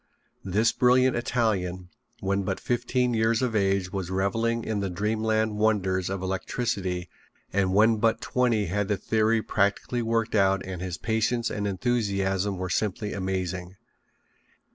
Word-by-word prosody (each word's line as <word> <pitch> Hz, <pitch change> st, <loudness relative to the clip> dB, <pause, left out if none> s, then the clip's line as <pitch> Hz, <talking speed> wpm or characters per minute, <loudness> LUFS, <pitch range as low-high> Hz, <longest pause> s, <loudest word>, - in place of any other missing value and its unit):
This 105 Hz, +5 st, +2 dB
brilliant 125 Hz, +1 st, +4 dB
Italian, 95 Hz, -7 st, -1 dB, 0.3 s
when 100 Hz, +1 st, 0 dB
but 95 Hz, 0 st, -2 dB
fifteen 125 Hz, 0 st, 0 dB
years 115 Hz, +2 st, +2 dB
of 120 Hz, -3 st, -1 dB
age 95 Hz, -2 st, +1 dB
was 95 Hz, -3 st, -3 dB
reveling 115 Hz, +5 st, 0 dB
in 110 Hz, -2 st, -2 dB
the 100 Hz, -1 st, -2 dB
dreamland 110 Hz, +3 st, 0 dB
wonders 95 Hz, -4 st, +1 dB
of 95 Hz, -1 st, -3 dB
electricity 95 Hz, -2 st, -2 dB, 0.5 s
and 95 Hz, -1 st, +1 dB
when 110 Hz, +2 st, +5 dB
but 115 Hz, +1 st, +2 dB
twenty 120 Hz, -5 st, +1 dB
had 100 Hz, +3 st, -1 dB
the 105 Hz, -1 st, 0 dB
theory 110 Hz, +1 st, +1 dB
practically 100 Hz, +4 st, 0 dB
worked 115 Hz, 0 st, 0 dB
out 95 Hz, -2 st, +2 dB
and 95 Hz, -2 st, -6 dB
his 90 Hz, -2 st, -4 dB
patience 115 Hz, +4 st, 0 dB
and 105 Hz, 0 st, -2 dB
enthusiasm 100 Hz, -3 st, 0 dB
were 95 Hz, 0 st, -3 dB
simply 105 Hz, +3 st, -1 dB
amazing. 95 Hz, -1 st, -3 dB
105 Hz, 140 wpm, -26 LUFS, 95-115 Hz, 0.5 s, when